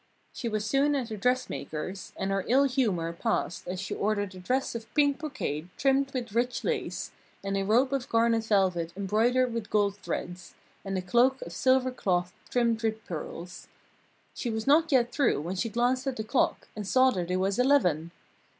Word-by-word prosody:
She 235 - -3
was 215 -1 -2
soon 280 +5 +2
at 255 -4 -2
the 220 - -4
dressmaker's, 195 -6 -2
and 190 +1 -2
her 195 -1 0
ill 265 +4 +5
humour 215 -12 0
passed 170 0 -2
as 180 +1 -3
she 195 - -4
ordered 205 -2 -1
a 185 - -10
dress 255 +9 -1
of 225 -1 -7
pink 285 -2 +3
brocade 185 - -4
trimmed 275 0 +2
with 240 -5 -4
rich 245 +2 0
lace, - - -2 0.3
and 195 0 -2
a 195 - +1
robe 245 +7 +3
of 270 -3 -2
garnet 230 -1 +2
velvet 185 -6 +1
embroidered 230 +5 +2
with 230 -3 -4
gold 205 -1 +1
threads, 180 -2 -6 0.3
and 195 -1 -3
a 185 - -3
cloak 245 +8 +3
of - - -9
silver 260 0 +3
cloth 180 -6 -1 0.2
trimmed 235 -2 +1
with 220 -1 -2
pearls. 175 +2 -7 0.7
She 245 - -3
was 220 -1 -3
not 315 +3 +4
yet 245 -3 +3
through 245 - +2
when 175 +5 -4
she 230 +5 -1
glanced 245 +4 0
at 265 - -1
the 220 - -3
clock, 240 +4 0
and 210 -2 -5
saw 260 +3 +5
that 180 -6 -3
it 180 - +1
was 195 +4 0
eleven. 180 - +3
225 Hz, 190 wpm, -28 LUFS, 190-255 Hz, 0.7 s, ill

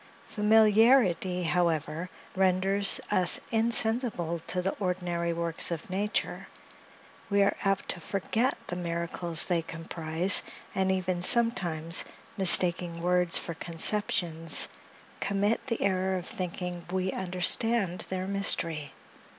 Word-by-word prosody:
Familiarity, 210 -3 +2
however, 165 0 -2 0.3
renders 190 +1 +4
us 180 -1 +5
insensible 225 -6 -1
to 180 - -3
the 190 +2 -3
ordinary 180 -3 -3
works 170 -1 -2
of 170 +1 -7
nature; 205 +3 -4 0.8
we 200 -1 +2
are 200 - 0
apt 195 -1 -2
to 180 - -3
forget 220 +8 -3
the 175 - -7
miracles 170 -1 +1
they 175 -2 -1
comprise, 165 +2 0 0.3
and 190 0 -1
even, 185 -1 -3
sometimes, 180 -8 +2 0.3
mistaking 175 -3 +6
words 180 0 +1
for 170 - -3
conceptions, 165 -1 +1 0.5
commit 200 +3 -2
the 230 -3 -3
error 190 -1 -1
of 180 - -8
thinking 180 -1 -7
we 185 0 -3
understand 185 +2 0
their 185 0 -5
mystery. 170 -6 0
180 Hz, 110 wpm, -27 LUFS, 170-200 Hz, 0.8 s, mistaking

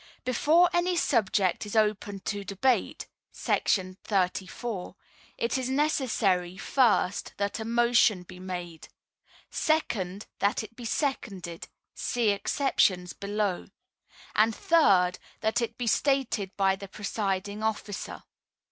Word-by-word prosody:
Before 310 +8 +4
any 355 +1 +2
subject 200 - +2
is 210 +1 -6
open 210 -2 +1
to 205 0 -3
debate 200 +7 0 0.3
[§ 185 -1 0 0.3
34] 190 +2 -6 0.4
it 470 - 0
is 255 0 -2
necessary, 225 - +1
first, 220 -4 +1
that 200 +2 -2
a 220 - -4
motion 235 -5 +3
he 180 0 -11
made; 175 -3 -6 0.6
second, 205 - -1
that 200 +2 +1
it 230 - -11
be 240 - -9
seconded, 200 - -3 0.3
(see 240 -4 0
exceptions 195 -5 +1
below); 200 -2 -2 0.7
and 220 +1 +3
third, 190 - +4 0.2
that 220 +2 +1
it 230 -1 -3
be 245 - -3
stated 255 -5 +1
by 195 -1 +3
the 200 +1 -9
presiding 200 0 -3
officer. 215 -2 -3
210 Hz, 115 wpm, -28 LUFS, 190-240 Hz, 0.7 s, Before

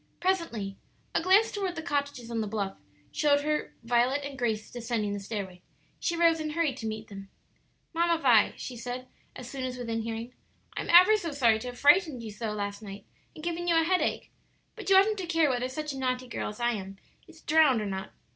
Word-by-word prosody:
Presently 330 - -1 0.4
a - - +2
glance 390 +6 +4
toward 385 -3 -3
the 320 - -5
cottages 285 -6 -2
on 230 -1 -1
the 215 - -2
bluff 200 -2 -3 0.4
showed 285 -1 +3
her 300 +1 -2
Violet 245 +4 +2
and 280 -1 -6
Grace 225 -4 -2
descending 230 -4 -2
the 205 - -3
stairway. 195 -3 -6 0.4
She 340 - -1
rose 335 -1 +4
and 310 -1 -3
hurried 315 -5 0
to 225 - -4
meet 220 0 -5
them. 195 -1 -9 0.6
"Mamma 335 0 +2
Vi," 240 -8 +4
she 250 - -6
said, 245 +2 -6 0.3
as 250 - -8
soon 265 0 -5
as 255 -1 -4
within 230 -2 -3
hearing, 230 +2 -5 0.4
"I - - -2
am - - -7
ever 365 +5 +8
so 340 -6 -4
sorry 235 -6 +3
to 250 - -7
have 245 0 -7
frightened 290 -3 +4
you 220 - -6
so 215 +1 -4
last 205 0 -4
night 200 -1 -9 0.3
and 310 - -10
given 345 +1 -3
you 340 - +3
a - - +3
headache. 365 +2 0 0.4
But - - -6
you 390 - +6
oughtn't 405 +2 +5
to 365 - -4
care 330 -4 +3
whether 250 0 -1
such 300 +2 -4
a 270 - -6
naughty 255 -1 -1
girl 235 - -4
as 210 - -10
I 240 0 +2
am 195 -3 -6 0.3
is - - -16
drowned 300 -6 +4
or 210 - -3
not." 190 -1 -4
255 Hz, 220 wpm, -28 LUFS, 220-325 Hz, 0.6 s, ever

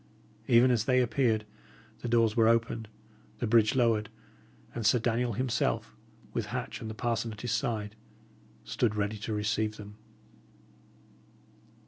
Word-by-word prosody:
Even 125 0 +6
as 115 -3 +1
they 130 0 +3
appeared, 120 -3 +1 0.5
the - - -5
doors 115 -2 +3
were 115 -2 +4
opened, 115 -1 +1 0.5
the - - -2
bridge 110 0 +4
lowered, 115 -4 +2 0.6
and 120 - -4
Sir 115 +4 +4
Daniel 120 0 0
himself, 115 - -1 0.4
with - - -2
Hatch - - -5
and 110 - -5
the 110 - -6
parson 115 0 -1
at 110 0 -9
his 120 - -3
side, 110 -6 -2 0.7
stood 110 -3 0
ready 105 0 -2
to 105 - -5
receive 105 +1 -1
them. 105 0 -11
115 Hz, 140 wpm, -29 LUFS, 110-120 Hz, 0.7 s, Even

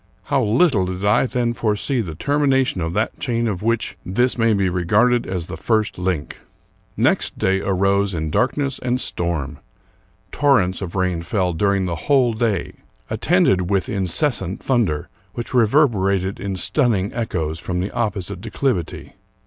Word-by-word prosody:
How 140 -1 +1
little 110 - +2
did 95 +2 -4
I 105 +5 +3
then 120 -1 -1
foresee 115 +3 0
the 85 -7 -6
termination 135 - +1
of 80 +1 -2
that 110 +4 -1
chain 120 -3 -1
of 100 -4 -3
which 115 +1 -1
this 120 +8 +1
may 115 -1 +2
be 100 -1 +1
regarded 105 +8 +2
as 90 -3 -3
the - - -7
first 110 -5 0
link! 90 -5 -2 0.6
Next - - +1
day 95 +1 +1
arose 100 0 +1
in 80 -1 -3
darkness 135 - 0
and 125 0 -1
storm. 80 - -2 0.7
Torrents 115 -12 +2
of 90 -2 -5
rain 90 -3 0
fell 90 0 -1
during 100 +2 +1
the 85 -2 -2
whole 130 -5 +4
day, 110 -4 -1 0.4
attended 90 -1 +2
with 95 -3 0
incessant 95 - -1
thunder, 110 - 0 0.3
which 120 +1 -5
reverberated 105 -7 +2
in 100 -1 -3
stunning 105 - +1
echoes 80 -9 -3
from 90 +1 -3
the 95 +3 -2
opposite 100 -4 -3
declivity. 115 - -3
100 Hz, 150 wpm, -21 LUFS, 90-120 Hz, 0.7 s, whole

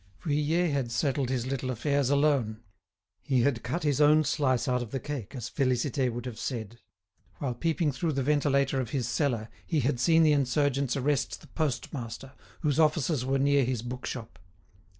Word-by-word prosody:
Vuillet 155 +2 +1
had 135 -4 -1
settled 135 +2 0
his 125 -2 -1
little 130 -1 -3
affairs 140 +2 0
alone. 140 -7 +1 0.6
He 130 -2 +1
had 125 -2 +1
cut 145 +9 -3
his 145 -1 +1
own 150 +1 +6
slice 135 -3 +1
out 125 -1 +1
of 120 - -5
the 135 - -3
cake, 140 -5 -6
as 125 -2 -4
Félicité 130 0 0
would 120 +1 -6
have 115 -3 -6
said. 115 -2 -5 0.6
While 135 -4 -2
peeping 160 +4 0
through 155 +4 -2
the 135 -1 -1
ventilator 140 -2 +2
of 120 - -5
his 125 -2 -1
cellar 120 -4 0 0.2
he 155 -4 0
had 125 -1 0
seen 165 +6 +4
the 155 -1 +5
insurgents 140 -1 +1
arrest 140 0 -1
the - - -15
postmaster, 130 -3 -4 0.3
whose 150 -2 +1
offices 155 -3 +2
were 135 +1 +1
near 140 0 +3
his 120 -2 -2
bookshop. 120 -2 -6
135 Hz, 175 wpm, -28 LUFS, 125-145 Hz, 0.6 s, own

